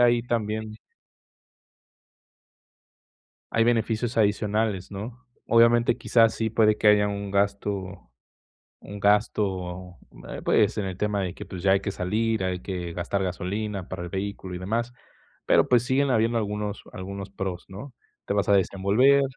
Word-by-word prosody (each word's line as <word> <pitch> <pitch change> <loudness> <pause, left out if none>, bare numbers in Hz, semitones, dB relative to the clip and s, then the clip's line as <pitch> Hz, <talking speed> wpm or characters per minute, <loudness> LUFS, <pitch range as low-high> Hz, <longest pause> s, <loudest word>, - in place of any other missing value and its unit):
ahí 120 -1 +4
también 110 -2 -2 2.8
Hay 115 0 +3
beneficios 115 0 0
adicionales, 105 -2 0
¿no? 115 +6 -8 0.2
Obviamente, 115 0 +4
quizás 115 -2 +3
sí 110 -1 -1
puede 110 -1 +3
que - - 0
haya 105 0 +5
un 100 0 -4
gasto 100 -5 -2 0.7
un 100 0 -9
gasto, 95 -3 0 0.3
eh, - - -6
pues, - - +3
en 105 - -1
el 95 -2 -5
tema 105 0 -1
de 90 -1 -3
que, 105 - -8
pues, 95 -2 -8
ya 95 - +5
hay 95 - +3
que 100 - -3
salir, 110 +3 -1
hay 90 -1 -2
que 90 -3 -5
gastar 95 +3 -2
gasolina 100 +2 -3
para 95 -1 -5
el - - -6
vehículo 95 0 -5
y - - -4
demás, 115 +6 -2 0.5
pero, - - +4
pues, 120 -2 +4
siguen 135 +2 +1
habiendo 115 -1 +2
algunos 105 -1 -3
algunos 100 +1 -6
pros, 95 -3 -5
¿no? 110 +9 -9 0.3
Te - - -1
vas 100 0 0
a - - +5
desenvolver. 100 +8 +4
105 Hz, 150 wpm, -25 LUFS, 95-115 Hz, 2.8 s, haya